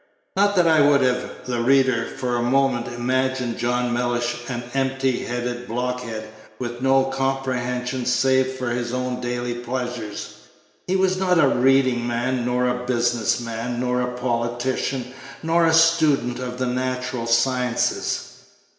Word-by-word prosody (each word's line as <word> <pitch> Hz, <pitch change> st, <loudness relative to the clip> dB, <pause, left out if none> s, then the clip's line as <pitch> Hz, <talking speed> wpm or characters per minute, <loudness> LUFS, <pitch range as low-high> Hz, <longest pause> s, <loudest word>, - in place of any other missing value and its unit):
Not 200 Hz, +1 st, +3 dB
that 180 Hz, -2 st, +4 dB
I 160 Hz, -2 st, +5 dB
would 145 Hz, -1 st, +5 dB
have 125 Hz, -1 st, -1 dB
the 125 Hz, -1 st, -2 dB
reader 130 Hz, -2 st, +3 dB
for 125 Hz, -1 st, -1 dB
a 120 Hz, -, 0 dB
moment 125 Hz, -1 st, +1 dB
imagine 125 Hz, 0 st, -1 dB
John 120 Hz, 0 st, 0 dB
Mellish 120 Hz, 0 st, -1 dB
an 120 Hz, -1 st, -3 dB
empty 135 Hz, -1 st, 0 dB
headed 120 Hz, 0 st, -4 dB
blockhead, 120 Hz, -2 st, -3 dB, 0.3 s
with 120 Hz, 0 st, -5 dB
no 135 Hz, 0 st, +4 dB
comprehension 130 Hz, -2 st, -2 dB
save 130 Hz, +1 st, +2 dB
for 130 Hz, -2 st, -3 dB
his 120 Hz, 0 st, -2 dB
own 125 Hz, 0 st, -2 dB
daily 120 Hz, 0 st, -2 dB
pleasures. 120 Hz, -3 st, -5 dB, 0.5 s
He 185 Hz, -, +1 dB
was 190 Hz, -1 st, +2 dB
not 185 Hz, -1 st, +2 dB
a 150 Hz, -, +5 dB
reading 130 Hz, -2 st, +3 dB
man, 120 Hz, +1 st, -1 dB
nor 125 Hz, +1 st, +1 dB
a 125 Hz, 0 st, -1 dB
business 120 Hz, -1 st, +1 dB
man, 120 Hz, +1 st, -4 dB
nor 125 Hz, 0 st, 0 dB
a 125 Hz, 0 st, -2 dB
politician, 125 Hz, +1 st, -2 dB, 0.3 s
nor 165 Hz, +1 st, +3 dB
a -, -, +4 dB
student 155 Hz, -7 st, +3 dB
of 125 Hz, -1 st, -5 dB
the 130 Hz, -, -1 dB
natural 125 Hz, -1 st, -2 dB
sciences. 125 Hz, +1 st, 0 dB
125 Hz, 145 wpm, -22 LUFS, 120-130 Hz, 0.5 s, I